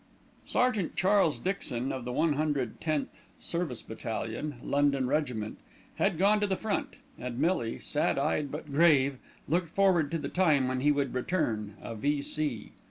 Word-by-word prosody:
Sergeant 235 -8 +1
Charles 190 -4 +3
Dixon, 135 -10 -2
of 130 -2 -5
the 125 - -3
110th 150 0 0 0.3
Service 170 -8 -3
Battalion, 115 +5 -4
London 140 -2 +2
Regiment, 125 -7 -1 0.4
had - - +1
gone 205 +4 +4
to 205 - +1
the 190 -1 0
front, 220 -2 -2 0.2
and 125 -1 -5
Millie, 140 -6 +1
sad 150 - 0
eyed, 145 0 0
but 150 0 -6
grave, 140 -4 +4 0.3
looked 170 +2 +1
forward 180 -5 +3
to 165 - -1
the 150 -3 -4
time 150 -7 +3
when 130 0 -1
he 145 +3 +4
would 140 -2 0
return, 115 - -1
a - - -5
V.C. 145 +1 -1
145 Hz, 150 wpm, -30 LUFS, 130-170 Hz, 0.4 s, gone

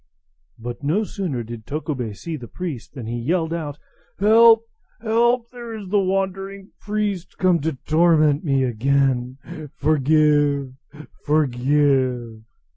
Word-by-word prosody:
But 120 +2 -7
no 170 +10 +1
sooner 175 - -4
did 115 -1 -9
Tokubei 140 -7 -3
see 165 - -6
the 125 -5 -9
priest 155 -4 -7
than 125 -5 -7
he 120 +2 -4
yelled 160 +6 -1
out, 150 -4 -4 0.4
"Help! 225 +3 +6 0.3
help! 235 +2 +1
Here 240 -2 -8
is 205 -4 -8
the 205 +1 +3
wandering 195 +1 -2
priest 205 -4 -3
come 180 -2 +3
to 160 +2 -2
torment 155 -2 +3
me 135 -4 +1
again. 130 +1 0 0.4
Forgive! 145 -2 +2 0.5
forgive!" 130 -4 +1
155 Hz, 120 wpm, -22 LUFS, 130-195 Hz, 0.5 s, Help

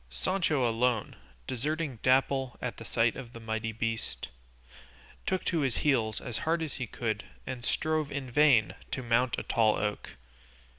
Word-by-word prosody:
Sancho 140 - +1
alone, 115 -1 +1 0.3
deserting 145 0 -2
Dapple 130 0 +2
at 125 - -4
the - - -8
sight 115 0 +2
of 125 -3 -8
the 115 - -8
mighty 110 0 -2
beast, 115 - -3 1.0
took 185 -1 0
to 170 - +1
his 135 -5 +1
heels 115 -7 +2
as 120 -5 -4
hard 165 +4 +1
as 155 - -4
he 130 -3 -4
could 110 -3 -2 0.2
and 130 -2 -5
strove 155 +2 0
in 135 -3 -4
vain 135 -5 +5 0.2
to 130 - -3
mount 120 +1 +2
a - - -3
tall 110 -2 +3
oak. 105 0 -3
125 Hz, 160 wpm, -30 LUFS, 115-140 Hz, 1.0 s, vain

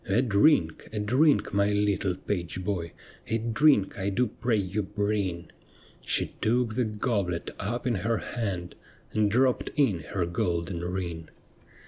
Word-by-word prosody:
' - - -28
A 105 +6 +3
drink, 100 - +3
a 110 - -5
drink, 130 +6 +3
my 100 +1 +3
little 100 -2 +1
page 90 -1 -4
boy, 90 -4 -3 0.3
A 115 - +1
drink 115 -1 +3
1 100 0 -2
do 125 - +3
pray 115 0 -1
you 100 +1 -1
bring 100 -4 -2 0.2
'; - - -27
She - - +1
took 120 0 +1
the 125 +1 +1
goblet 105 -5 -2
up 120 +5 -3
in 125 - +1
her 115 +3 0
hand 95 -8 -4 0.4
And 105 -1 +2
dropped 125 +4 +2
in 135 - +2
her 90 +1 -2
golden 85 0 -2
ring. 85 -3 -4
100 Hz, 155 wpm, -27 LUFS, 90-115 Hz, 0.4 s, A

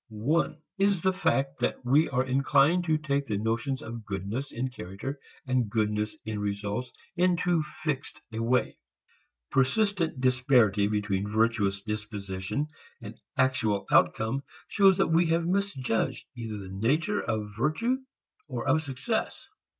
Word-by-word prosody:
One 130 +10 0 0.2
is 195 -3 +3
the 190 0 +3
fact 140 -7 0
that - - -1
we 145 +6 +4
are 130 -2 +1
inclined 140 +6 +3
to 160 -2 +2
take 140 -2 -1
the 105 - -1
notions 115 +5 -1
of 115 0 -7
goodness 105 +7 -4
in 130 +2 -2
character 125 +6 -6 0.3
and 130 -4 +1
goodness 105 +3 0
in 110 -1 -3
results 105 +4 -3 0.2
in 180 0 +3
too 175 -2 +2
fixed 150 -2 -4
a 110 - -2
way. 125 +2 +1 0.7
Persistent 165 +3 +1
disparity 125 -6 +3
between 105 -1 -1
virtuous 105 -3 +1
disposition 105 +5 -3 0.3
and 110 -2 -8 0.2
actual 120 -6 +1
outcome 110 +5 +3 0.3
shows 195 -2 +5
that 195 - +4
we 165 +1 +4
have 165 +1 +1
misjudged 175 - -1
either 115 -3 -5
the 95 -2 -8
nature 145 - +1
of 105 -2 -3
virtue 155 - +1 0.5
or 125 -2 -4
of 150 +4 +4
success. 135 -4 -3
130 Hz, 140 wpm, -28 LUFS, 105-155 Hz, 0.7 s, shows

